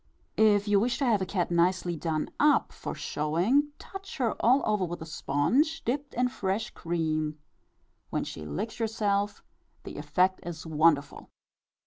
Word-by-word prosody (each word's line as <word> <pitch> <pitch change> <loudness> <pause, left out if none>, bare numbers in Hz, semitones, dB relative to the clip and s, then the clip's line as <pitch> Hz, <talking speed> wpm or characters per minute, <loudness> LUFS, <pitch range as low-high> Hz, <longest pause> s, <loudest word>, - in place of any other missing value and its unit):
(N.B. 215 -1 +5
If 205 +1 -1
you 205 -1 +4
wish 240 +4 0
to 275 - 0
have 220 -5 +3
a 190 - -1
cat 180 -3 -1
nicely 175 0 +2
done 155 -1 -2
up 295 0 +4
for - - -6
showing, 175 - +1
touch 390 0 -9
her 240 -4 +1
all 255 +5 +4
over 210 -3 +1
with 175 -1 -4
a 160 - -7
sponge 245 - +1
dipped 275 +4 -2
in 250 +1 +2
fresh 210 -2 -2
cream, 155 -2 -2 0.7
when - - -1
she 75 - -7
licks 210 - -4
herself 210 -3 -1 0.4
the - - -8
effect 185 +1 +1
is 170 -2 -7
wonderful.) 155 -2 +1
195 Hz, 160 wpm, -28 LUFS, 165-230 Hz, 0.7 s, N.B